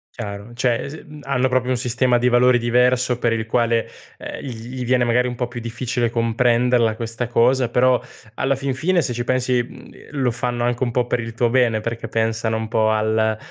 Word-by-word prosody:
Chiaro, 100 -1 -7
cioè 120 -1 0
s 155 +3 -9
mhmm, 150 -2 -12
hanno 130 -1 +1
proprio 130 0 0
un 130 - +1
sistema 125 0 +1
di 120 +1 +1
valori 125 0 +4
diverso 125 +1 +2
per 120 -1 0
il 110 -1 -1
quale, 115 0 +1 0.3
ehm, - - -7
gl 140 - -6 0.2
gli 130 -1 -4
viene, 125 0 +2
magari, 125 +1 +2
un 125 - -5
po' 125 0 -2
più 120 0 -7
difficile 120 +1 -2
comprenderla 115 0 +2
questa 115 +1 -4
cosa. 120 +1 +2
Però, 125 +1 +3 0.3
alla 135 +4 0
fin 135 -1 -2
fine, 170 +6 +1
se 130 -4 -2
ci 120 +1 -3
pensi, 125 0 +1
mhmm, - - -14 0.3
lo 130 -2 +2
fanno 120 0 -2
anche 120 +1 0
un 120 - -1
po' 120 0 0
per 120 0 0
il 115 0 -6
tuo 120 +1 +1
bene, 120 -3 +2
perché 115 0 -5
pensano 110 0 0
un 110 0 -4
po' 110 0 +2
al 110 0 +1
120 Hz, 215 wpm, -21 LUFS, 115-125 Hz, 0.3 s, valori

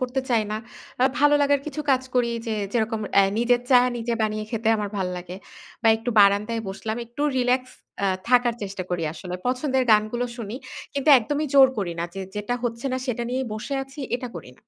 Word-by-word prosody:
করতে 255 +1 -1
চাই 225 -2 +3
না। 215 - -1 0.5
আ - - +6
ভালো 290 +1 +5
লাগার 285 -1 +3
কিছু 305 0 -4
কাজ 260 -1 +3
করি 240 -1 +2 0.2
যে 225 - -1 0.2
যেরকম 225 -1 0 0.2
এ্যা 200 - +7
নিজের 240 +1 +3
চা 250 - +8 0.2
নিজে 235 0 -2
বানিয়ে 215 0 -1
খেতে 225 -1 -1
আমার 205 -1 -3
ভাল 190 -2 -1
লাগে। 180 +1 -7 0.5
বা 225 - +4
একটু 225 +2 -4
বারান্দায় 205 +3 +4
বসলাম। 220 +3 -4
একটু 240 +5 -5 0.2
রিল্যাক্স 255 +1 +1 0.3
এ্যা 200 - +2 0.2
থাকার 245 -2 +4
চেষ্টা 195 -1 -4
করি 175 -2 -1
আসলে। 180 +2 -7
পছন্দের 260 +1 +1
গানগুলো 215 +3 +3
শুনি। 225 0 -6 0.4
কিন্তু 280 +2 -1
একদমই 290 +6 -2
জোর 270 -1 +8
করি 175 -4 -2
না। 170 - -1
যে 195 - -5 0.2
যেটা 210 +4 -2
হচ্ছে 235 +2 -3
না - - +1
সেটা 240 -1 -2
নিয়েই 255 +1 -2
বসে 245 +6 -4
আছি 270 +2 -10 0.2
এটা 250 0 -6
করি 155 - -9
না। - - -25
235 Hz, 205 wpm, -24 LUFS, 210-255 Hz, 0.5 s, চা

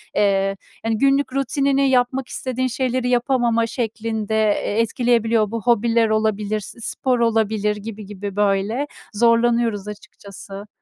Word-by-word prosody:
eee, 195 -1 +2 0.3
hani, 225 -1 +1
günlük 275 +2 +2
rutinini 275 0 +1
yapmak 255 0 +1
istediğin 255 0 -2
şeyleri 255 0 -1
yapamama 240 -2 +2
şeklinde, 220 -2 -3
eee, 215 0 +1
etkileyebiliyor. 230 -2 +1
Bu 230 -1 -3
hobiler 230 0 +2
olabilir, 215 -1 0
s 210 +3 -10
spor 255 +2 -1
olabilir 220 -2 +1
gibi 210 0 -8
gibi 200 -1 -7
böyle 205 +7 0 0.3
zorlanıyoruz 230 -2 +2
açıkçası. 200 -1 -10
225 Hz, 120 wpm, -21 LUFS, 210-245 Hz, 0.3 s, eee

